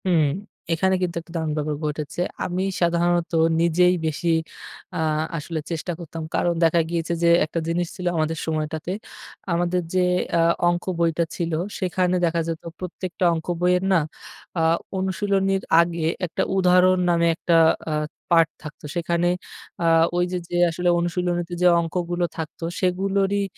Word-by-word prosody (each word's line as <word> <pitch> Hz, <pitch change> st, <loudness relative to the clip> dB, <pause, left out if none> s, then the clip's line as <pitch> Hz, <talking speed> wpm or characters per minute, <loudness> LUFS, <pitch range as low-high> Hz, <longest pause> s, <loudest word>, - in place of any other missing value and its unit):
হু, -, -, +1 dB, 0.6 s
এখানে 190 Hz, +3 st, +2 dB
কিন্তু 180 Hz, -2 st, -1 dB
একটা 165 Hz, +1 st, -17 dB
দারুন 160 Hz, -1 st, -1 dB
ব্যাপার 150 Hz, 0 st, -1 dB
ঘটেছে। 150 Hz, +2 st, -3 dB, 0.2 s
আমি 185 Hz, +1 st, -1 dB, 0.2 s
সাধারণত 170 Hz, 0 st, +2 dB, 0.3 s
নিজেই 175 Hz, +2 st, +4 dB
বেশি 160 Hz, +2 st, -1 dB, 0.7 s
আ -, -, -2 dB, 0.4 s
আসলে 160 Hz, +1 st, -4 dB
চেষ্টা 165 Hz, +2 st, -3 dB
করতাম। 165 Hz, -1 st, -7 dB
কারণ, 175 Hz, -, +2 dB
দেখা 165 Hz, +1 st, +4 dB
গিয়েছে 170 Hz, 0 st, -1 dB
যে 170 Hz, -, +5 dB, 0.2 s
একটা 160 Hz, +2 st, -3 dB
জিনিস 170 Hz, +1 st, 0 dB
ছিল 180 Hz, -, -7 dB
আমাদের 160 Hz, +1 st, 0 dB
সময়টাতে। 155 Hz, +1 st, -3 dB, 0.6 s
আমাদের 175 Hz, +1 st, +1 dB
যে 185 Hz, 0 st, +3 dB, 0.3 s
আ -, -, +3 dB, 0.3 s
অংক 175 Hz, 0 st, -1 dB, 0.2 s
বইটা 170 Hz, 0 st, +2 dB
ছিল 170 Hz, -2 st, -2 dB, 0.3 s
সেখানে 185 Hz, -1 st, +1 dB
দেখা 170 Hz, 0 st, +1 dB
যেত 165 Hz, -1 st, -3 dB, 0.2 s
প্রত্যেকটা 180 Hz, 0 st, -3 dB
অংক 160 Hz, -, -6 dB
বইয়ের 180 Hz, +1 st, +3 dB
না -, -, +6 dB, 0.6 s
আ -, -, +2 dB, 0.4 s
অনুশীলনীর 195 Hz, 0 st, 0 dB, 0.2 s
আগে 170 Hz, -1 st, -1 dB, 0.2 s
একটা 165 Hz, -, -3 dB, 0.2 s
উদাহরণ 185 Hz, 0 st, +5 dB
নামে 170 Hz, -1 st, +3 dB
একটা 170 Hz, 0 st, +1 dB, 0.3 s
আ -, -, -1 dB, 0.4 s
পার্ট 165 Hz, -2 st, +5 dB
থাকতো। 150 Hz, 0 st, -10 dB
সেখানে 170 Hz, 0 st, 0 dB, 0.6 s
আ -, -, +1 dB, 0.3 s
ওই 175 Hz, -, +2 dB
যে, 180 Hz, -, -1 dB
যে, -, -, -4 dB
আসলে 175 Hz, +2 st, 0 dB
অনুশীলনীতে 175 Hz, 0 st, -1 dB
যে 180 Hz, -, +6 dB
অংকগুলো 175 Hz, +1 st, -1 dB
থাকতো 160 Hz, 0 st, -6 dB, 0.2 s
সেগুলোরই 195 Hz, +2 st, +1 dB
175 Hz, 150 wpm, -23 LUFS, 165-180 Hz, 0.7 s, না